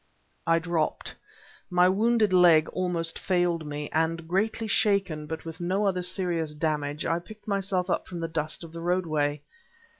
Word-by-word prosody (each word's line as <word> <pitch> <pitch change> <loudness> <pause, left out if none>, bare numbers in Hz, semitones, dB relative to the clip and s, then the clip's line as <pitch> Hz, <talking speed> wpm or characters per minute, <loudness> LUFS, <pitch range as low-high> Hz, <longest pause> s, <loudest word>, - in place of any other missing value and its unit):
I 165 0 +4
dropped. 165 -1 -1 0.6
My 180 0 +4
wounded 215 +1 +2
leg 170 -4 +6
almost 170 -3 -1
failed 175 -4 0
me; 150 0 -4
and 165 +1 0
greatly 215 +5 0
shaken, 195 -8 +1
but 160 +1 -6
with 165 +1 -8
no 190 +4 0
other 185 -2 +1
serious 175 -4 -1
damage, 150 -1 -2
I 165 +1 +1
picked 215 +5 -14
myself 195 -2 0
up - - -1
from 175 - -6
the 165 - -2
dust 160 +2 -3
of 165 - -10
the 165 - -7
roadway. 155 -5 0
170 Hz, 160 wpm, -27 LUFS, 160-185 Hz, 0.6 s, leg